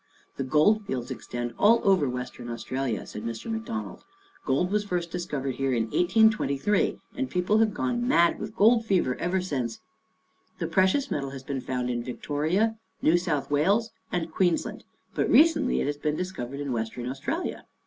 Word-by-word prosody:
" -, -, -35 dB
The 135 Hz, -, -1 dB
Gold 155 Hz, +11 st, +3 dB
Fields 125 Hz, -1 st, -3 dB
extend 120 Hz, -1 st, -5 dB
all 230 Hz, +3 st, +6 dB
over 185 Hz, -8 st, +3 dB
Western 125 Hz, -1 st, -6 dB
Australia," 120 Hz, 0 st, -3 dB
said 105 Hz, -, -7 dB
Mr. 115 Hz, -, -5 dB
McDonald. 225 Hz, 0 st, -5 dB, 0.2 s
" 395 Hz, -, -30 dB
Gold 150 Hz, +7 st, +1 dB
was 210 Hz, 0 st, +1 dB
first 175 Hz, -4 st, -3 dB
discovered 145 Hz, -7 st, -3 dB
here 135 Hz, -1 st, 0 dB
in 115 Hz, -2 st, +2 dB
1823 205 Hz, -3 st, +2 dB, 0.2 s
and 265 Hz, -1 st, -2 dB
people 185 Hz, +4 st, +2 dB
have 220 Hz, -1 st, +3 dB
gone 240 Hz, +3 st, -1 dB
mad 170 Hz, -9 st, +4 dB
with 215 Hz, +1 st, -6 dB
gold 230 Hz, +1 st, +5 dB
fever 180 Hz, -, +1 dB
ever 180 Hz, +2 st, 0 dB
since. 130 Hz, -10 st, -3 dB, 0.8 s
The -, -, -2 dB
pre 185 Hz, 0 st, +3 dB
cious 275 Hz, +8 st, 0 dB
metal 140 Hz, -2 st, -2 dB
has 135 Hz, -1 st, -8 dB
been 135 Hz, -1 st, -3 dB
found 125 Hz, -1 st, -2 dB
in 120 Hz, -1 st, -2 dB
Victoria, 160 Hz, -, -1 dB, 0.2 s
New 160 Hz, -, +5 dB
South 150 Hz, -6 st, -2 dB
Wales 200 Hz, +11 st, +2 dB, 0.2 s
and 170 Hz, -2 st, -2 dB
Queensland, 175 Hz, 0 st, 0 dB, 0.3 s
but -, -, 0 dB
recently 305 Hz, -4 st, +4 dB
it -, -, 0 dB
has 145 Hz, +1 st, -2 dB
been 150 Hz, 0 st, -1 dB
discovered 140 Hz, -7 st, -5 dB
in 140 Hz, -2 st, -3 dB
Western 115 Hz, +1 st, -3 dB
Australia. 145 Hz, -, -4 dB
170 Hz, 180 wpm, -27 LUFS, 130-210 Hz, 0.8 s, all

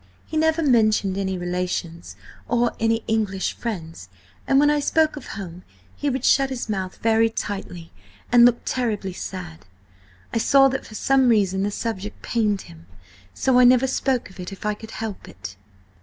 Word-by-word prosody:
He -, -, -8 dB
never 320 Hz, +1 st, +2 dB
mentioned 215 Hz, -7 st, +3 dB
any 190 Hz, -1 st, -2 dB
relations 175 Hz, -, -4 dB, 0.3 s
or 240 Hz, 0 st, +1 dB
any 225 Hz, 0 st, +1 dB
English 210 Hz, -4 st, -1 dB
friends, 165 Hz, -, -6 dB, 0.4 s
and 270 Hz, -, +4 dB
when 295 Hz, +1 st, +5 dB
I 295 Hz, -, +2 dB
spoke 315 Hz, +2 st, +2 dB
of 285 Hz, -, -9 dB
home, 180 Hz, -3 st, -7 dB, 0.3 s
he 290 Hz, -, -1 dB
would 265 Hz, 0 st, -2 dB
shut 270 Hz, -1 st, +4 dB
his 260 Hz, -2 st, -4 dB
mouth 190 Hz, -3 st, -3 dB
very 225 Hz, 0 st, +4 dB
tightly, 195 Hz, -6 st, -6 dB, 0.4 s
and 240 Hz, -1 st, +7 dB
look 240 Hz, 0 st, +5 dB
terribly 210 Hz, -7 st, -2 dB
sad. 175 Hz, -, -8 dB, 0.7 s
I -, -, +1 dB
saw 270 Hz, +3 st, +5 dB
that 265 Hz, -, -4 dB
for 215 Hz, -, -11 dB
some 265 Hz, +2 st, +3 dB
reason 195 Hz, -4 st, +2 dB
the 200 Hz, -, 0 dB
subject 210 Hz, -1 st, -5 dB
pained 210 Hz, -4 st, 0 dB
him, 85 Hz, 0 st, -15 dB, 0.5 s
so 260 Hz, -2 st, +3 dB
I -, -, +7 dB
never 250 Hz, +1 st, +6 dB
spoke 260 Hz, -4 st, -1 dB
of 190 Hz, -, -17 dB
it 180 Hz, +2 st, -6 dB
if 195 Hz, -, -9 dB
I 210 Hz, -, +1 dB
could 220 Hz, +1 st, -11 dB
help 220 Hz, -3 st, -6 dB
it." 95 Hz, 0 st, -9 dB
220 Hz, 175 wpm, -23 LUFS, 190-250 Hz, 0.7 s, and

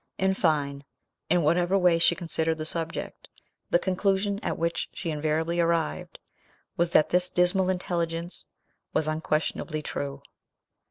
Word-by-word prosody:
In 190 Hz, 0 st, +2 dB
fine, 145 Hz, -6 st, 0 dB, 0.5 s
in 175 Hz, 0 st, +3 dB
whatever 175 Hz, +5 st, +3 dB
way 180 Hz, -3 st, +4 dB
she -, -, +4 dB
considered 165 Hz, -2 st, 0 dB
the 155 Hz, -, -4 dB
subject, 165 Hz, 0 st, -4 dB, 0.4 s
the -, -, +5 dB
conclusion 195 Hz, +2 st, 0 dB
at -, -, -2 dB
which 170 Hz, 0 st, -1 dB
she 165 Hz, -, -3 dB
invariably 155 Hz, +3 st, -1 dB
arrived 165 Hz, -, 0 dB, 0.6 s
was, 170 Hz, 0 st, +1 dB
that 155 Hz, -, +4 dB
this 180 Hz, 0 st, +2 dB
dismal 180 Hz, +1 st, +2 dB
intelligence 170 Hz, -2 st, -3 dB, 0.5 s
was 155 Hz, -, +1 dB
unquestionably 155 Hz, 0 st, -1 dB
true. 140 Hz, -1 st, -5 dB
170 Hz, 130 wpm, -27 LUFS, 155-180 Hz, 0.6 s, the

